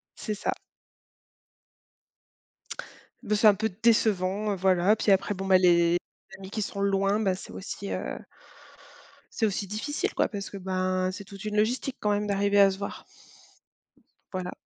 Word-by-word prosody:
C'est 215 -2 -4
ça. - - -1 2.7
Beh, 210 -1 0
c'est 215 +1 +5
un 210 - +8
peu 220 +2 -1
décevant, 210 -2 +2
heu, - - 0
voilà. 185 +2 +3
Puis, 210 - +1
après, 195 +1 +2
bon, 195 0 -5
bah, 190 -1 +6
les 170 -1 +4 0.4
amis 190 0 -10
qui 215 - -3
sont 200 0 -4
loin, 195 +1 +2
ben, 190 -4 +1
c'est - - -10
aussi, 200 +1 -6
heu, - - -3 1.1
c'est 225 - 0
aussi 200 -1 -1
difficile, 225 +9 -3
quoi, - - +2
parce 200 -1 -6
que, 200 - -8
ben, 185 0 -1
c'est 200 +2 -8
toute 200 +1 -11
une 210 0 -3
logistique, 250 +5 0
quand 210 - 0
même, 205 0 0
d'arriver 200 0 +2
à 195 -1 +7
se 190 - -6
voir. 200 - -6 1.3
Voilà. 185 -1 -4
200 Hz, 165 wpm, -27 LUFS, 190-210 Hz, 2.7 s, un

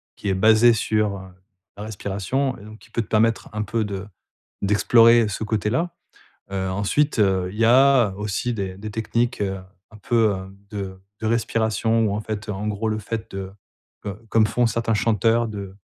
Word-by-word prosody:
qui 100 - -4
est - - +2
basé 110 +5 +5
sur, 105 -2 0
heu, 95 0 -11 0.5
la 105 - -6
respiration 110 +6 -2
et - - -13
donc 110 +1 -12
qui - - -19
peut 115 - -1
te 110 - -8
permettre 115 +1 +1
un 105 0 -2
peu 110 +2 -1
de 100 -1 -5 0.5
d'explorer 115 +3 +5
ce 105 +1 -4
côté-là, 110 - -1 0.6
heu, 95 -1 -2
ensuite, 105 +10 0
heu, 95 -3 +2
il 105 - -9
y 115 - +4
a 130 -2 +5
aussi 105 +4 -2
des 95 -3 -4
des 105 +2 -6
techniques, 115 +2 -1
heu, 95 -1 -1 0.3
un 110 - -14
peu, 110 0 +2
hem, 95 0 -7
de 95 -3 -6 0.2
de 110 - -3
respiration 115 0 +1
où 100 - -1
en 105 - -2
fait, 110 0 -5
en 105 0 -4
gros, 105 +1 -2
le 110 0 -1
fait 110 +1 -5
de, 95 -1 -5 0.6
heu, 100 - -3 0.2
comme 110 -1 +4
font 120 +2 +1
certains 115 0 0
chanteurs 115 +2 +2
de 100 -3 -7
110 Hz, 190 wpm, -23 LUFS, 100-115 Hz, 0.6 s, basé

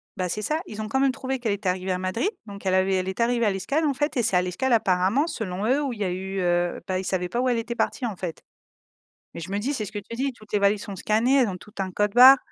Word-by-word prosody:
bah, 185 -1 -1
c'est 210 - -2
ça, 305 +8 0
ils 215 -6 -7
ont 215 - -4
quand 265 - +1
même 275 -1 +3
trouvé 265 -1 -3
qu'elle 225 -4 0
était 200 -2 -2
arrivée 185 +1 -2
à - - -1
Madrid, 185 - -1 0.2
donc 200 -1 -10
elle 185 - +2
avait 190 0 +3
elle 185 0 -1
est 190 - -6
arrivée 235 -1 +2
à 205 - +3
l'escale, 280 +12 -1
en 285 - +2
fait 295 +3 -1
et 240 - +2
c'est 210 -4 +2
à - - +4
l'escale, 235 +8 -1
apparemment, 200 - +2
selon 200 - -3
eux, 270 +5 +2
où 270 -4 -2
il 215 - -10
y - - 0
a 185 - 0
eu, 190 +2 -4
heu, 175 -1 0
bah, 185 -1 0
ils 190 - -5
savaient 180 -2 -1
pas 235 - -2
où 255 - +1
elle 240 - +1
était 235 +1 -3
partie, 250 +1 -1
en 215 -5 -3
fait. 175 -3 -6 0.9
Mais - - -7
je 180 - -7
me 200 - 0
dis 270 +7 -1
c'est 225 - -2
ce - - -8
que 205 - -4
tu 230 +3 -9
dis, 270 +2 -1
toutes 215 -2 -18
les 205 - +3
valises 200 +1 +2
sont 200 -4 -7
scannées, 225 +7 +2
elles 240 - +3
ont 180 - -5
toutes 210 +1 -16
un 185 -1 -3
code 205 +2 0
barre. 260 +3 +10
210 Hz, 315 wpm, -25 LUFS, 185-245 Hz, 0.9 s, barre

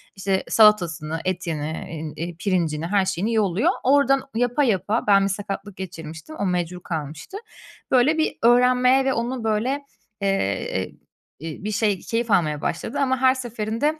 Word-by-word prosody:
işte 195 0 -1
salatasını, 170 -7 +3
etini, 165 -1 -3 0.2
eee, 170 +2 -5
pirincini, 170 -5 0
her 195 +1 +2
şeyini 200 +5 -1
yolluyor. 210 -1 +2
Oradan 275 0 +4
yapa 245 +4 +1
yapa 210 0 0
Ben 195 -1 +5
bir - - 0
sakatlık 200 0 -5
geçirmiştim, 165 - -8
o - - 0
mecbur 180 -1 -2
kalmıştı. 155 - -5 0.5
Böyle 265 +5 +4
bir 315 - 0
öğrenmeye 250 +2 +5
ve 265 - +2
onu 240 +1 -2
böyle, 225 +6 0 0.4
eee, 195 - 0 0.6
ııı, 165 - -4 0.2
bir 215 - -1
şey 205 -2 +1
keyif 230 +3 -2
almaya 155 -6 +2
başladı 275 +11 -3
ama 260 -2 +2
her 260 0 +5
seferinde 240 +4 -2
205 Hz, 145 wpm, -23 LUFS, 175-245 Hz, 0.6 s, Ben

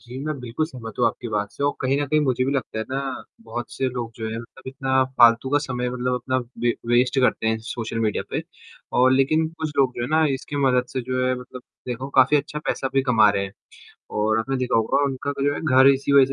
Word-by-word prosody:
जी, 125 +1 -9
मैं 155 -2 -3
बिल्कुल 125 +6 -2
सहमत 120 -7 -9
हूँ 120 - +4
आपकी 120 - -3
बात 105 -1 -2
से - - -6
और 145 - +2
कहीं 130 +1 +1
न 145 - -1
कहीं 155 +2 +2
मुझे 130 -3 +1
भी 135 - 0
लगता 135 -5 -3
है 110 - -2
ना, 135 0 -3 0.2
बहुत 120 - -6
से 130 - -1
लोग 120 -2 -5
जो 110 -1 -4
हैं 110 - -4
मतलब 120 +3 -13
इतना 130 0 +1
फालतू 120 +2 +6
का 145 - +4
समय 125 -3 -3
मतलब 125 0 -1
अपना 130 +1 -1 0.3
वे 120 -1 +2
वेस्ट 125 +3 +2
करते 125 -3 +1
हैं 110 0 +1
सोशल 115 0 -4
मीडिया 110 -2 0
पे - - -2 0.6
और 130 +1 +5
लेकिन 150 +5 +3
कुछ 160 -1 -5
लोग 130 -2 +3
जो - - -2
है 120 - -2
ना 160 0 +4
इसके 140 +2 -6
मदद 125 -1 +2
से 130 - -1
जो 130 +1 -1
है 130 - +2
मतलब 125 0 -11 0.3
देखो 125 +2 -4
काफ़ी 130 +3 +6
अच्छा 150 +1 -2
पैसा 135 - -1
भी 135 - +3
कमा 115 -5 +5
रहे 100 -1 -1
हैं। 100 - -8 0.7
और 110 +1 +2
आपने 135 +4 -2
देखा 125 -2 +1
होगा 115 +5 +2
उनका 140 +1 -3
जो 145 +1 +2
है - - -5
घर 130 -3 +5
इसी 135 +1 -2
वजह 140 -1 +7
130 Hz, 245 wpm, -23 LUFS, 120-135 Hz, 0.7 s, वजह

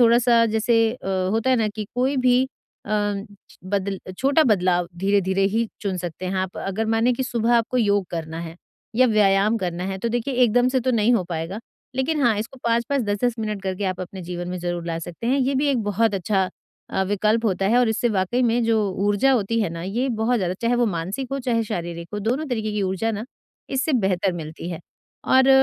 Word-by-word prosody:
थोड़ा 235 0 +6
सा 235 -1 +4
जैसे 225 +1 +2
अ, 245 - -10 0.3
होता 225 +4 +1
है 255 - +4
ना 220 -2 +1
कि 215 -1 -4
कोई 260 +3 +1
भी 250 0 +5 0.4
अ, - - -7 0.7
बद 195 0 -1 0.2
छोटा 280 +4 +4
बदलाव 180 -3 +1
धीरे-धीरे 195 0 +2
ही 230 0 +1
चुन 195 -3 -2
सकते 175 +1 -5
हैं 185 - -2
आप। 185 0 -3
अगर 195 +3 -2
माने 230 +3 +3
कि 245 - -2
सुबह 240 -1 +1
आपको 235 +2 0
योग 205 -4 +2
करना 160 -1 -4
है 165 0 -7 0.4
या 255 +1 +6
व्यायाम 210 -1 +3
करना 180 -2 -3
है 190 0 -3
तो 235 - -1
देखिए 240 +3 -2
एकदम 245 +1 +4
से 260 0 +1
तो 255 +2 0
नहीं 230 -1 +3
हो 220 - +2
पाएगा, 170 +3 -4 0.4
लेकिन 290 +3 0
हाँ, 235 -4 +3
इसको 225 +5 -6
5-5, 235 +4 +1
10-10 205 +4 0
मिनट 215 -2 -3
करके 190 +1 -3
आप 185 -1 -2
अपने 185 +1 -7
जीवन 175 0 -5
में 180 0 -4
ज़रूर 175 -1 -3
ला 165 -1 -2
सकते 175 +7 -7
हैं 265 +3 +2
ये 270 +1 +1
भी 275 +3 +1
एक 260 -5 +1
बहुत 205 +1 +1
अच्छा 190 0 0 0.4
अ, - - 0
विकल्प 210 +3 +1
होता 195 -1 0
है 230 +5 +4
और 250 -2 +3
इससे 220 +2 +1
वाक़ई 210 +4 0
में 240 0 +2
जो 225 -1 +3 0.3
ऊर्जा 205 +7 +3
होती 230 -1 +1
है 210 - +1
ना, 165 0 -6
ये 230 +9 -1
बहुत 230 +3 +2
ज़्यादा 185 -4 -1
चाहे 235 +1 +2
वो 240 0 +3
मानसिक 195 +7 -3
हो, 275 - -1
चाहे 240 -3 0
शारीरिक 170 -5 -5
हो, - - -2
दोनों 245 +9 -1
तरीके 220 -4 -2
की 210 -1 -1
ऊर्जा 190 +4 0
ना 215 0 -4 0.5
इससे 275 +4 0
बेहतर 190 -1 +1
मिलती 165 0 -6
है। 170 - -5 0.4
और 260 0 +4
215 Hz, 220 wpm, -23 LUFS, 185-240 Hz, 0.7 s, थोड़ा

